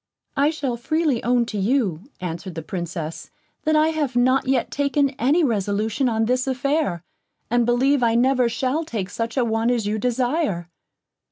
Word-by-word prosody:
"I 285 +2 +3
shall 280 -6 -2
freely 305 0 0
own 245 0 +2
to 215 -2 -4
you," 200 - 0
answered 175 0 -5
the 165 - -5
Princess, 170 -2 -5 0.4
"that 310 0 +3
I 310 +1 +4
have 300 -6 -2
not 255 +2 +3
yet 265 -1 +1
taken 285 -1 +1
any 295 +7 +3
resolution 220 +1 0
on 225 -1 +1
this 255 +3 0
affair, 265 - 0 0.5
and 240 -1 +2
believe 260 +3 +3
I 230 -1 +3
never 250 0 +3
shall 260 +7 -1
take 210 - -4
such 230 +2 -3
a 250 - +3
one 225 +1 +1
as 240 -4 0
you 215 +1 -1
desire." 245 - -1
245 Hz, 170 wpm, -22 LUFS, 215-275 Hz, 0.5 s, I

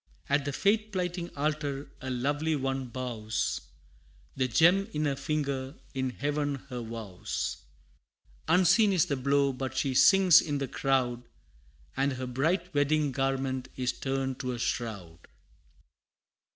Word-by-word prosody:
At 140 0 +2
the 145 - -1
faith 210 +8 +1
plighting 180 -2 -2
altar, 145 -1 -2
a 130 - -5
lovely 145 +5 0
one 135 -1 -2
bows, 115 -3 -3 0.7
The 130 -1 +1
gem 175 - +4
on 150 0 0
her 140 -2 +1
finger, 140 -1 -2 0.2
in 130 -1 -1
Heaven 145 +2 -1
her 125 -2 -4
vows; 110 -5 -4 0.9
Unseen 185 +5 +5
is 180 - +4
the 140 - -1
blow, 140 +1 +2
but 130 0 -5
she 135 0 +1
sinks 185 +5 +7
in 145 -2 -2
the 135 -1 -2
crowd, 125 -3 0 0.7
And 135 +1 +1
her 130 0 -4
bright 160 +8 0
wedding 145 0 +2
garment 135 -1 -1
is 125 -1 0
turned 135 -1 -2
to 125 -1 -2
a - - -4
shroud! 100 -9 -4
135 Hz, 140 wpm, -29 LUFS, 130-150 Hz, 0.9 s, sinks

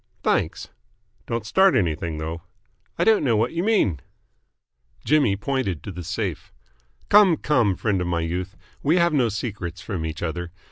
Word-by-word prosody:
"Thanks." - - 0 0.6
"Don't 115 -2 -3
start 190 - +4
anything, 80 -3 -1
though." 80 +2 -5 0.6
"I - - +2
don't 220 -5 +4
know 120 -6 +2
what 115 +3 0
you 170 +1 -1
mean." 195 - +2 1.1
Jimmy 145 -9 +3
pointed 105 - -2
to 100 - -6
the 90 -1 -7
safe. - - -4 0.6
"Come, 200 -6 +6
come, 120 -12 +2
friend 100 -3 0
of 90 - -2
my 85 -1 0
youth. 90 +4 -4 0.2
We 150 +4 +2
have 170 -2 +3
no 125 -6 +3
secrets 100 -5 -5
from 90 -5 -4
each 80 +1 -5
other. 85 +1 -4
100 Hz, 160 wpm, -23 LUFS, 85-140 Hz, 1.1 s, Come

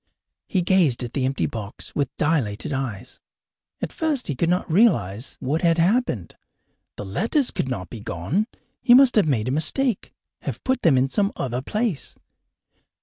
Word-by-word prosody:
He 185 -4 0
gazed 170 -10 +3
at 120 - -6
the 135 -3 0
empty 135 +1 0
box 105 -3 -6
with 140 -3 0
dilated 145 -6 0
eyes. 125 -3 -4 0.6
At - - -3
first 305 -6 -1
he 145 - -1
could 165 +6 0
not 180 +1 +1
realize 140 - +2
what 150 +6 -1
had 170 -1 +3
happened. 170 - +1 0.6
The 105 - -6
letters 230 - +1
could 130 - -2
not 90 -8 -4
be 115 - -7
gone! 105 - -2 0.3
He 240 - +7
must 265 -1 +6
have 210 -7 +4
made 120 -6 +1
a - - 0
mistake, 225 - 0 0.3
have - - -6
put 260 0 0
them 155 -6 +4
in 130 +1 +3
some 200 +8 +1
other 125 -1 -2
place! 210 - -2
150 Hz, 170 wpm, -23 LUFS, 120-205 Hz, 0.6 s, He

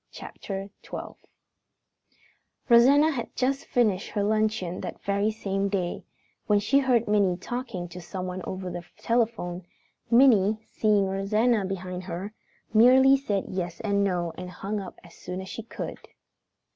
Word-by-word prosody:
CHAPTER 195 0 -7
XII - - -7 1.6
Rosanna 275 +6 +6
had 245 -6 -5
just 270 +2 -1
finished 210 -6 +1
her 205 - -1
luncheon 215 -4 0
that - - -6
very 200 +1 +1
same 200 -2 -2
day, 185 -3 -2 0.4
when 210 - +4
she 225 +7 +3
heard 250 -4 +2
Minnie 200 -4 +2
talking 200 -4 -5
to 180 +1 -9
someone 185 +1 -5
over 185 -1 -5
the 175 - -6
telephone. 220 -7 -1 0.5
Minnie, 225 -4 +5
seeing 210 -2 +2
Rosanna 205 +3 +1
behind 185 -1 -5
her, 185 +4 -5 0.4
merely 260 +4 +7
said 210 -8 -1
yes 175 -2 -4
and 200 -2 +1
no 175 -4 -1
and 180 0 -6
hung 200 +3 -4
up 195 - -9
as 170 - -15
soon 180 +1 -7
as 190 0 -7
she - - -6
could. 225 - -7
200 Hz, 145 wpm, -26 LUFS, 185-230 Hz, 1.6 s, merely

